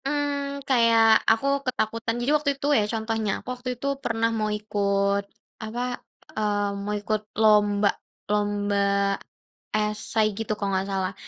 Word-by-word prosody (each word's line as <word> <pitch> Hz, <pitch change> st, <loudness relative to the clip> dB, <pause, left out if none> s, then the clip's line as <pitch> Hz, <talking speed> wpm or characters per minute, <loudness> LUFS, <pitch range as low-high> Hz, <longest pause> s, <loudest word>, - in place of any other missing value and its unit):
Mmm, 280 Hz, -1 st, -2 dB
kayak 230 Hz, -3 st, +4 dB, 0.3 s
aku 225 Hz, +4 st, +1 dB, 0.2 s
ketakutan 230 Hz, -2 st, -1 dB
jadi 250 Hz, +4 st, +1 dB
waktu 295 Hz, -1 st, -1 dB
itu 280 Hz, -, -3 dB
ya 215 Hz, -, +3 dB
contohnya 220 Hz, -1 st, -1 dB
aku -, -, -14 dB
waktu 250 Hz, 0 st, -6 dB
itu 275 Hz, -, -4 dB, 0.2 s
pernah 230 Hz, 0 st, +1 dB
mau 215 Hz, -1 st, -1 dB
ikut 200 Hz, -1 st, 0 dB, 0.4 s
apa, 220 Hz, +2 st, -4 dB, 0.6 s
eee, 205 Hz, -1 st, 0 dB
mau 210 Hz, +1 st, -2 dB
ikut 210 Hz, +1 st, -1 dB, 0.2 s
lomba 205 Hz, -1 st, +4 dB, 0.4 s
lomba, 205 Hz, -1 st, 0 dB, 1.0 s
esay 215 Hz, +1 st, 0 dB
gitu 225 Hz, -1 st, -2 dB
kalau 200 Hz, -1 st, -1 dB
nggak, 190 Hz, +1 st, -1 dB
salah 190 Hz, 0 st, -1 dB
215 Hz, 140 wpm, -25 LUFS, 205-230 Hz, 1.0 s, kayak